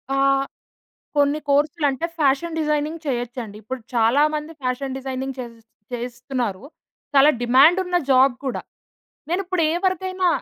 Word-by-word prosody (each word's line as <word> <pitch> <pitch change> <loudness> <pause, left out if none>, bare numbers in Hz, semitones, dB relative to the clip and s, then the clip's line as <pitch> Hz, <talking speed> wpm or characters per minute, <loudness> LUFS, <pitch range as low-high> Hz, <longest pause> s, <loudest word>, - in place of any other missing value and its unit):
ఆహ్, 275 0 +3 0.7
కొన్ని 285 +1 +3
కోర్సులంటే, 290 0 +1
fashion 305 +3 +1
designing 305 +1 -1
చేయొచ్చండి. 240 -4 -4
ఇప్పుడు 260 +4 -5
చాలా 235 +5 +3
మంది 300 +1 -5
ఫ్యాషన్ 260 +1 -2
డిజైనింగ్ 265 0 -4
చేసేస్ 230 -2 -9 0.3
చేస్తున్నారు. 240 -3 -4 0.5
చాలా 280 +1 +7
డిమాండున్న 330 +9 +4
జాబ్ 260 0 +5
కూడా. 260 - -2 0.7
నేనిప్పుడేవరికైనా 370 +1 0
275 Hz, 105 wpm, -22 LUFS, 250-315 Hz, 0.7 s, చాలా